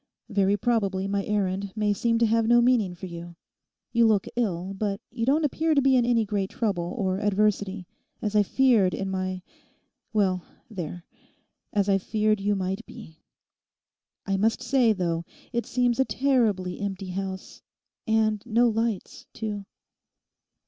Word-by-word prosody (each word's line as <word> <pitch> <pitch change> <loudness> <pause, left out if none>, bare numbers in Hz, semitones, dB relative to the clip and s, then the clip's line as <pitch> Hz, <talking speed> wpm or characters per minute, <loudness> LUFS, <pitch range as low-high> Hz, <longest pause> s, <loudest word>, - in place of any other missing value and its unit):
Very 200 -1 +2
probably 200 -4 0
my 200 0 -1
errand 195 -1 -1
may 210 -1 +1
seem 230 +3 +1
to 230 - +3
have 225 0 +2
no 240 +1 +6
meaning 235 -7 +2
for 175 - -8
you. 170 -1 -8 0.6
You 235 -1 +4
look 210 -3 +2
ill, 195 -5 -1
but 200 0 -2
you 230 +1 -3
don't 300 +3 +3
appear 315 +2 +1
to 280 - +4
be 265 -1 +4
in 245 -2 +3
any 230 -2 +3
great 195 -2 -1
trouble 180 -6 -2
or 190 -3 0
adversity, 205 -2 0 0.3
as 210 0 -3
I 210 - +6
feared 220 -3 +3
in 195 -1 -3
my—well, 185 +1 -4 0.3
there—as 180 +3 -6
I 195 -1 +3
feared 215 +1 +1
you 205 +1 +1
might 190 0 -2
be. 160 0 -12 1.1
I 195 -1 0
must 220 +3 +1
say, 255 -4 +3
though, 170 -4 -1 0.3
it 235 0 -1
seems 245 0 +1
a 265 - +4
terribly 225 -11 +1
empty 195 -1 -4
house. 190 0 -5 0.5
And 220 -1 +2
no 235 +1 +3
lights, 225 -2 -3
too! 210 -2 -4
205 Hz, 150 wpm, -26 LUFS, 190-230 Hz, 1.1 s, no